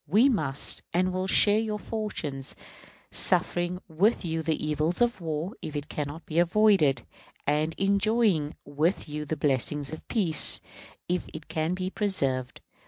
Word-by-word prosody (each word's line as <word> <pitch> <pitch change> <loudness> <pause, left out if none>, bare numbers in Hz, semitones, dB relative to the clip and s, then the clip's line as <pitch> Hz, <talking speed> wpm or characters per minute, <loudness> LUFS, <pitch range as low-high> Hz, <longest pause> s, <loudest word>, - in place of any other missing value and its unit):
We 215 - +5
must 155 - +1
and 185 +1 +1
will 185 +1 -2
share 205 +2 +5
your 215 -1 -2
fortunes, 180 -12 -4 0.6
suffering 175 +1 +1
with 185 +6 +1
you 165 -1 -2
the 160 -1 -2
evils 155 +3 0
of 240 -5 +1
war 160 +4 -3
if 155 - -6
it 145 0 -4
can 150 -2 -3
not 155 +4 -9
be 160 +1 -1
avoided; 175 - +3 0.4
and 155 +2 0
enjoying 200 -5 +2
with 155 +7 -1
you 150 0 -5
the 155 +1 -3
blessings 145 +1 0
of 155 - -9
peace, 180 -9 +4 0.5
if 180 -1 -1
it 155 -1 -9
can 160 +2 -1
be 185 0 -3
preserved. 135 - -1
165 Hz, 155 wpm, -27 LUFS, 150-195 Hz, 0.6 s, We